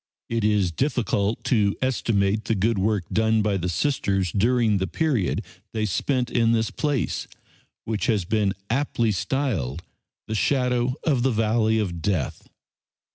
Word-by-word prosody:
It 115 -2 -1
is 105 -4 +2
difficult 115 - 0
to 105 -6 +2
estimate 110 -5 0
the 115 - +1
good 105 +2 +1
work 105 -1 +1
done 110 0 +2
by 105 -2 +1
the 90 -1 -2
Sisters 95 - 0
during 115 0 +2
the 95 0 -1
period 125 - 0 0.3
they 110 -1 0
spent 125 +5 -1
in 115 -1 +3
this 110 -1 +1
place, 145 -5 -1 0.6
which 110 +1 -2
has 105 -7 +1
been 105 0 +1
aptly 120 -2 0
styled 95 - -2 0.4
the 110 - -3
"shadow 125 +1 +1
of 140 -6 +2
the 135 - +2
valley 110 -1 +2
of 90 -6 -2
death." 90 -7 -2
110 Hz, 145 wpm, -24 LUFS, 100-125 Hz, 0.6 s, in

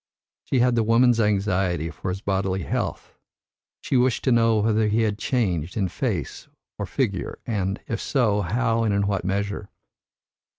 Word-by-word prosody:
She 130 - +1
had 125 0 +3
the 115 - +2
woman's 115 +2 +4
anxiety 95 -6 +1
for 85 - -5
his 95 +2 -4
bodily 95 -2 -1
health, - - -3 0.7
she 130 - 0
wished 125 -1 +2
to 130 - +2
know 115 -1 +4
whether 110 0 +2
he 110 +2 +2
had 105 -1 -1
changed 90 - -1
in 95 -4 0
face - - -3 0.3
or - - -3
figure, - - -2
and, 100 -3 -2
if 115 - -3
so, 110 -7 +1
how 115 +4 0
and 105 -3 +1
in 100 0 +1
what 100 -2 -1
measure. 100 +2 -2
105 Hz, 165 wpm, -24 LUFS, 95-115 Hz, 0.7 s, woman's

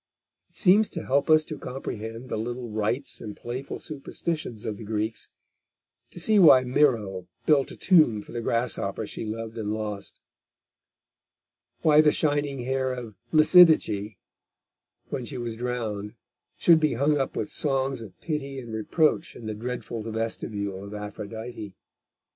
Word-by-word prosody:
It - - -16
seems 205 +3 +5
to 170 - -6
help 140 +4 +1
us 155 0 +5
to 150 - -7
comprehend 115 -1 -6
the - - -2
little 120 +1 -4
rites 110 +6 -2
and 105 -2 -7
playful 125 +3 -5
superstitions 150 -4 -4
of 105 -2 -3
the 115 - -9
Greeks; 110 +1 -3 0.8
to - - -10
see 210 +4 +4
why 150 -8 +8
Myro 115 -9 +1 0.2
built 145 -3 +3
a - - -8
tomb 155 - +4
for - - -14
the 120 - -4
grasshopper 115 +1 -1
she - - -6
loved 115 +1 -5
and 105 -1 -2
lost; 105 -2 -5 1.6
why 155 -1 +7
the 150 -1 +5
shining 145 -3 0
hair 130 +1 0
of 120 -4 -6 0.2
Lysidice, 155 - +5 0.9
when 125 - -3
she 130 +2 -6
was 120 -2 -4
drowned, 110 -4 -4 0.4
should 165 -2 +6
be 155 -2 +2
hung 145 +4 +2
up 135 - -2
with 155 - -3
songs 135 -3 0
of 100 -5 -11
pity 140 -4 -3
and 120 -3 -8
reproach 155 +9 +1
in 115 - -10
the 110 - -3
dreadful 120 +1 -5
vestibule 110 -3 -3
of 100 +1 -8
Aphrodite. 105 0 -7
120 Hz, 150 wpm, -26 LUFS, 110-145 Hz, 1.6 s, why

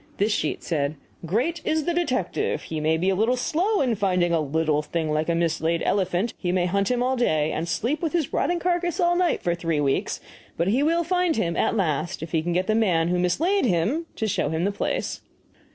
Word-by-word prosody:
This 205 +3 +1
sheet 215 - -1
said, 150 -3 -1 0.3
"Great 255 - 0
is 315 0 0
the 345 - 0
detective! 260 - -1
He 160 - -4
may 160 +1 +1
be 185 +4 +1
a - - +1
little 225 +6 +2
slow 365 - +1
in 255 -4 +2
finding 180 -4 +1
a 165 - +3
little 155 0 0
thing 155 0 -2
like 155 +2 0
a 170 - +2
mislaid 165 0 0
elephant 190 +2 0
he 175 - -1
may 180 -1 +1
hunt 200 +2 0
him 245 -1 +1
all 260 +1 +1
day 155 -11 +1
and 165 +2 -3
sleep 270 +7 -1
with 325 -3 -1
his 335 -5 -1
rotting 345 +5 +1
carcass 350 0 -1
all 350 -1 +3
night 350 -2 +1
for 175 - +1
three 165 -3 -1
weeks, 140 -2 0 0.4
but 170 +3 +1
he 245 +7 +2
will 335 +3 +2
find 360 -1 +1
him 170 -6 0
at 225 - +1
last 175 -1 -1
if 160 - -7
he 160 - +1
can 175 +2 -2
get 180 +2 +1
the 215 - +1
man 180 -7 +2
who 180 0 +1
mislaid 320 - +1
him 230 - 0
to 220 - -2
show 200 - 0
him 160 +2 -1
the 200 - +1
place!" 200 - -2
190 Hz, 230 wpm, -24 LUFS, -, 0.4 s, a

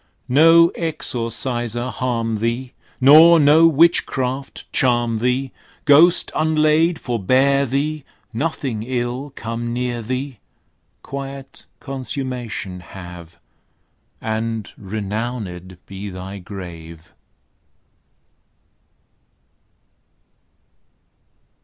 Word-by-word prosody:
No 165 +3 +6
exorciser 120 -5 -2
harm 115 -3 -2
thee! 120 +4 -3 0.3
Nor 160 +5 +8
no 155 +3 +6
witchcraft 140 -4 +1
charm 120 -3 +2
thee! 125 +2 0 0.3
Ghost 165 +5 +5
unlaid 155 +1 +2
forbear 130 +5 +2
thee! 145 +4 -2 0.3
Nothing 130 -3 -2
ill 125 +3 -3
come 115 +1 -4
near 120 -1 -2
thee! 130 +1 -4 0.6
Quiet 135 0 -8
consummation 125 -8 -5
have; 90 -2 -11 0.8
And 110 -1 -3
renowned 100 -3 -5
be 100 +1 -7
thy 95 +1 -8
grave! 85 -4 -10
125 Hz, 70 wpm, -20 LUFS, 110-140 Hz, 0.8 s, Nor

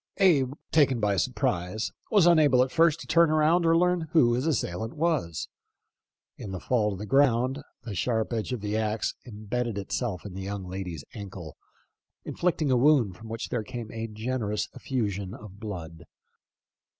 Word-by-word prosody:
Abe, 145 -10 +4 0.2
taken 140 -6 +4
by 105 -2 +1
surprise, 90 +4 -1 0.2
was 205 -5 +5
unable 150 -7 +5
at 130 - -4
first 165 -1 +3
to - - -8
turn 170 -1 +4
around 155 +3 +3
or 165 0 +5
learn 180 -1 +2
who 120 -8 +5
his 125 +6 0
assailant 110 - -2
was. 150 - -1 0.9
In 100 - -7
the 95 -1 -5
fall 110 -1 +1
to 100 - -4
the 105 - -6
ground, 130 +1 +2 0.2
the 115 -3 -6
sharp 110 +4 -1
edge 110 +2 -2
of 125 -4 -3
the 105 +1 -2
axe 110 0 -1
imbedded 115 0 -3
itself 100 0 -3
in 100 - -7
the 95 - -6
young 100 0 -5
lady's 90 -5 -5
ankle, 95 -7 -8 0.7
inflicting 160 -5 0
a 125 - +4
wound 125 -8 +4
from 110 +4 -11
which 115 0 -5
there 120 - -1
came 120 -1 -7
a 115 0 -4
generous 110 -1 -2
effu 125 -5 -2
sion 100 +1 -6
of 105 -3 -12
blood. 85 -6 -7
115 Hz, 175 wpm, -27 LUFS, 100-140 Hz, 0.9 s, was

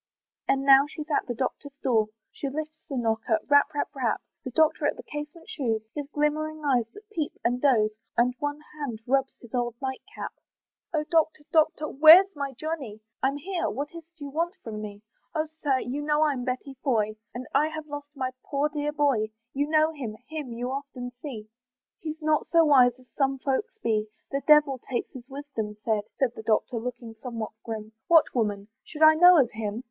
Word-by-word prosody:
And 270 0 +2
now 275 +1 +7
she's 305 0 -7
at - - +1
the 240 - -3
doctor's 275 +3 -4
door, 225 -4 +3 0.2
She 280 - -4
lifts 310 +2 -5
the 275 - -3
knocker, 225 -1 +1
rap, 285 +1 +5
rap, 290 - 0
rap, 255 -5 0 0.2
The - - -4
doctor 315 +2 +3
at - - 0
the - - -9
casement 295 +4 -7
shews, 245 - -1
His 290 -2 -4
glimmering 310 +1 -1
eyes 250 -5 +2
that 415 +1 -13
peep 315 -8 -2
and 245 +1 +1
doze; 225 -7 +4 0.3
And 245 +1 +4
one 290 +1 -3
hand 275 -7 -5
rubs 270 +1 +1
his 240 - -15
old 240 -2 -1
night 265 -1 -3
cap. - - -5 0.6
"Oh 310 -2 0
Doctor! 315 -1 +1
Doctor! 315 -1 +3
where's 325 +7 +8
my 280 -1 -3
Johnny?" 270 -7 -5 0.2
"I'm 275 +2 +1
here, 355 +4 -2
what 290 +3 -4
is't 335 0 -12
you 285 -1 -6
want 335 +5 -1
with 225 - -5
me?" 210 -1 -7 0.3
"Oh 310 0 +1 0.2
Sir! 275 -3 +2
you 270 +4 -3
know 300 +1 +2
I'm 275 -5 0
Betty 255 +2 -3
Foy, 215 -6 +1 0.2
"And 250 +1 -5
I 305 - +4
have 315 0 -6
lost 290 0 -8
my 260 -2 -2
poor 285 +1 0
dear 295 0 -2
boy, 280 -8 +2 0.2
"You 285 +1 0
know 310 0 +4
him 245 -9 -6
him 305 -5 -5
you 245 +2 -3
often 270 -3 -5
see; 230 -8 -7 0.5
"He's 315 0 -6
not 305 0 +2
so 335 -1 +6
wise 255 -4 +6
as 255 - -19
some 270 -1 +1
folks 295 - -2
be," 215 -1 +1 0.2
"The 275 - -1
devil 295 -3 +6
take 240 0 -4
his 255 0 -11
wisdom!" 265 -7 -5
said 215 -2 +1 0.2
The 245 -4 0
Doctor, 225 +2 +1
looking 235 -1 -6
somewhat 230 -4 -4
grim, 220 -1 -6 0.2
"What, 330 -2 +5
woman! 205 -4 -1
should 310 0 -2
I 310 0 +10
know 355 +2 +8
of 245 -4 +3
him?" 215 0 -3
275 Hz, 195 wpm, -27 LUFS, 240-305 Hz, 0.6 s, I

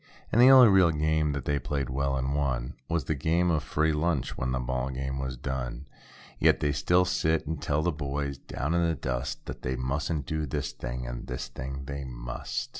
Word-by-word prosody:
And 120 - +5
the 125 - +9
only 130 -2 +10
real 95 -4 +6
game 80 -1 +1
that 70 -2 -3
diey 70 -3 0
played 70 -3 -1
well 70 +1 0
and 65 +1 -1
won. 65 -4 -1 0.2
Was 85 -2 0
the 80 - -1
game 85 +4 +1
of 80 -3 +1
"free 80 +1 +1
lunch" 75 -3 0
when 65 +1 -2
the 65 - 0
ball 65 +1 -2
game 65 +1 -3
was 65 -1 -3
done. 65 0 -4 0.5
Yet, - - +4
they 75 - +1
still 90 +6 +3
sit 80 -3 +1
and 80 +1 -4
tell 75 +1 0
the 90 - +2
boys 70 -2 -3
down 75 +6 -3
in 85 0 +2
the 80 - 0
dust. 65 -1 -3
That - - -7
they 65 +1 -2
mustn't 70 +3 -2
do 80 0 -2
this 65 - -2
thing, 60 +1 -5
and - - -6
this 65 0 -5
thing 65 +2 -6
they 70 0 -5
must. - - -5
70 Hz, 215 wpm, -28 LUFS, 65-80 Hz, 0.5 s, only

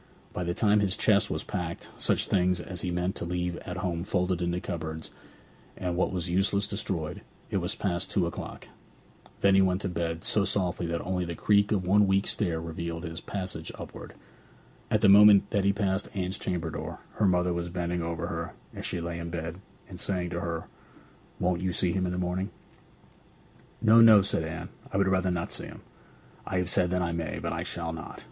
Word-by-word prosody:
By 90 - -2
the 85 0 -2
time 105 -1 +4
that 100 - +3
his 95 -1 +1
chest 105 -1 +4
was 75 - -2
packed, 85 -4 -4
such - - +2
things 90 -1 +2
as 90 -2 -4
he 90 - -2
meant 90 +2 -1
to - - -2
leave 90 0 -2
at 90 - -6
home 90 -3 -2
folded 90 -1 0
into 85 0 0
cupboards, 80 -2 -5 0.7
and 90 -1 -2
what 90 - +1
was 90 -3 -2
useless 95 +3 +2
destroyed, 95 -6 -3 0.3
it - - +1
was - - 0
past 90 -2 -1
two 95 -4 +1
o'clock. 85 - -6 0.7
Then 100 -1 +5
he 95 - +6
went 95 0 +2
to - - 0
bed, 85 -1 -3
so 105 - +3
softly 90 -3 0
that 85 0 -2
only 90 0 -1
the 85 0 -4
creak 100 +4 +3
of 95 -4 +1
one 100 +2 +5
weak 95 +1 +2
stair 85 -6 +1
revealed 85 0 -5
his 80 -1 -5
passage 90 -5 -5
upward. - - -9 0.7
At - - +2
the - - +6
moment 100 0 +8
that 100 -1 +1
he 100 - +5
passed 100 -1 -1
Anne's 95 0 -2
chamber 85 -3 -2
door - - -6 0.2
her 105 - +3
mother 90 -1 +2
was 85 0 -3
bending 85 0 -2
over 85 0 -3
her - - -4 0.2
as - - -4
she 90 - -2
lay 85 0 -4
in 85 0 -5
bed, 85 +1 -5 0.3
and 90 -2 -9
saying 90 -2 -2
to 85 - -2
her, 85 -1 -3 0.8
'Won't 90 -1 +1
you 95 -1 0
see 90 0 +2
him 95 0 0
in - - -2
the 90 - -3
morning?' 90 +2 -1 1.3
'No, 115 +1 +7
no,' 110 -3 +8
said 95 -4 0
Anne. 80 0 -5 0.2
'I - - -1
would 100 -1 +3
rather 95 -1 +2
not 85 -1 -2
see - - -5
him! - - -11 0.7
I 95 - -1
have 90 -1 0
said 90 -2 +3
that 90 0 0
I 85 - -1
may. 85 -2 -3
But - - -3
I - - -3
shall 85 -1 -2
not. 80 -2 -8
90 Hz, 210 wpm, -28 LUFS, 85-95 Hz, 1.3 s, moment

